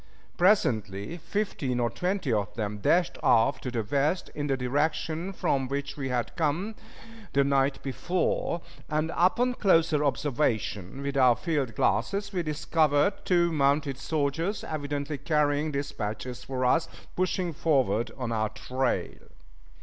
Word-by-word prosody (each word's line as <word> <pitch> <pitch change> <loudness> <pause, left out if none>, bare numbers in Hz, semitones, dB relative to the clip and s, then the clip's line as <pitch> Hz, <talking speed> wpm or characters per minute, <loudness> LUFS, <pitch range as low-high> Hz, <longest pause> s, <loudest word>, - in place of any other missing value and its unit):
Presently 110 - +2
fifteen 170 -8 -2
or 120 -1 +1
twenty 180 - -1
of 100 -4 0
them 105 -2 -3
dashed 170 - +2
off 115 +4 +3
to 125 - -3
the 120 -2 -2
west, 145 - 0
in 145 0 -3
the 135 -2 +1
direction 155 +6 -1
from 135 -8 0
which 140 +1 -3
we 135 -2 -4
had 125 -2 -2
come 170 +7 0 0.6
the 140 +1 +4
night 135 0 +2
before; 170 +4 -1 0.3
and 155 +2 0
upon 240 +8 +3
closer 165 -8 +3
observation 130 -6 -1
with 140 0 -3
our 125 -3 +6
field 140 - -2
glasses 195 - 0
we 180 - 0
discovered 155 +2 +2
two 175 -2 +3
mounted 140 -2 +1
soldiers, 160 +7 -1
evidently 145 -1 -3
carrying 150 -1 +1
dispatches 125 -3 -4
for 130 -1 -2
us, 165 +6 +3 0.3
pushing 185 -1 0
forward 130 -8 +1
on 125 -3 -3
our 110 -1 0
trail. 130 +4 -1
145 Hz, 135 wpm, -28 LUFS, 125-165 Hz, 0.6 s, our